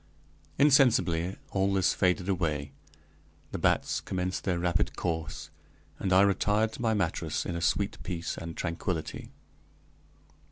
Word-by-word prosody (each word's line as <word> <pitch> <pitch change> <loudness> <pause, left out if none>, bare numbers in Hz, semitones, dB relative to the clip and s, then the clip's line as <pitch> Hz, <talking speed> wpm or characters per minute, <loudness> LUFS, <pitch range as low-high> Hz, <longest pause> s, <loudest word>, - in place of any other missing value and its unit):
Insensibly 125 - +4 0.2
all 95 0 +1
this 95 -2 +3
faded 90 0 +1
away, 80 -7 -1 0.8
the - - -4
bats - - +1
commenced 90 0 -3
their 90 -3 +1
rapid 85 0 0
course, 80 -4 -4 0.5
and 95 - -1
I 95 +1 +6
retired 105 +2 +2
to - - -7
my 110 -2 +2
mattress 95 -6 -1
in 85 -1 -3
sweet 100 +4 0
peace 85 -4 -4
and 85 0 -7
tranquillity. 85 -1 -3
90 Hz, 125 wpm, -29 LUFS, 85-100 Hz, 0.8 s, I